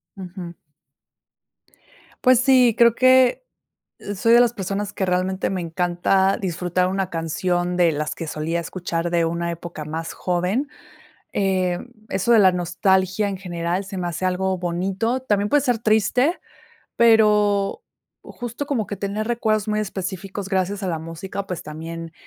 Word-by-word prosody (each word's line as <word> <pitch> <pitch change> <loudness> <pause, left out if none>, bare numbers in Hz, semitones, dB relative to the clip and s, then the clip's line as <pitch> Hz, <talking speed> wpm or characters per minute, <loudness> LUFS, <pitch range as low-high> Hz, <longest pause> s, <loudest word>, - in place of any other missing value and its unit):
Ujú. 180 -2 -8 1.7
Pues 255 -2 +6
sí, 255 -3 +4
creo 235 -1 +5
que 255 - +4 0.7
soy 230 +4 +3
de 240 - +8
las 240 -1 +3
personas 200 0 -3
que 190 - -1
realmente 185 +1 0
me 190 -2 -2
encanta 180 +3 +1
disfrutar 180 0 0
una 190 0 -1
canción 175 +2 -1
de 175 -2 +4
las 150 0 -3
que 165 - -6
solía 155 +3 -2
escuchar 170 0 -3
de 170 -1 +2
una 170 +1 -2
época 170 -2 -7
más 160 +2 -5
joven, 180 +10 -1 0.7
em, 185 +2 0 0.2
eso 195 +5 +1
de 230 - +7
la 190 -2 +6
nostalgia 185 +3 +1
en 195 -1 -4
general 175 0 -3
se 195 0 -8
me 180 - -2
hace 175 +2 -2
algo 185 +1 0
bonito, 190 +8 -1
también 205 -4 +1
puede 290 -1 +4
ser 245 -4 +1
triste, 230 - +2 0.6
pero 210 -3 +3 0.4
justo 240 +3 -6
como 255 -8 -1
que 205 - -5
tener 205 +2 -3
recuerdos 220 -3 0
muy 215 0 0
específicos 195 0 -5
gracias 195 +1 -1
a 190 - -2
la 165 -2 -1
música, 165 +5 -6
pues 180 -3 -5
también 165 +2 -7
190 Hz, 150 wpm, -22 LUFS, 175-215 Hz, 1.7 s, de